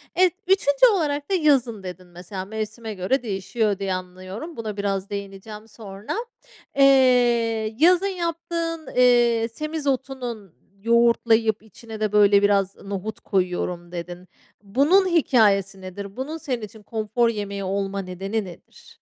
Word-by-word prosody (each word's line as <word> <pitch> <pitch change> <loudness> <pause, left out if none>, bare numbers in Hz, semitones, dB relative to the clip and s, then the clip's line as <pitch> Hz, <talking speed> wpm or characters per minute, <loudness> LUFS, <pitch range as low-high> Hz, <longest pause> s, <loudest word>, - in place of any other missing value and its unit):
Evet, 365 -1 +4
3'üncü 380 - +4
olarak 290 -4 -1
da - - +2
yazın 260 - +2
dedin 180 0 -8
mesela. 180 +2 -8
Mevsime 220 +1 -5
göre 200 +8 -1
değişiyor 205 0 -1
diye 195 -1 -1
anlıyorum. 185 - -7
Buna 215 -2 -5
biraz 200 -1 -2
değineceğim 200 +2 -7
sonra. 205 -2 -8 0.6
Eee, 240 -5 +4
yazın 360 +4 +5
yaptığın, 335 -2 -3
eee, 240 -2 +4
semizotunun, 265 - -4 0.3
yoğurtlayıp 230 -2 +3
içine 220 +1 -11
de 215 -1 0
böyle 205 -1 +5
biraz 200 -1 +2
nohut 200 +2 -6
koyuyorum 180 -2 -2
dedin. 175 +1 -7 0.4
Bunun 285 - +3
hikâyesi 205 - +2
nedir? 195 +2 -8
Bunun 295 +5 -4
senin 255 -6 -4
için 215 0 -10
konfor 225 +2 0
yemeği 200 -2 -4
olma 195 +1 -2
nedeni 195 +3 -4
nedir? 175 -2 -15
220 Hz, 125 wpm, -23 LUFS, 195-260 Hz, 0.6 s, yazın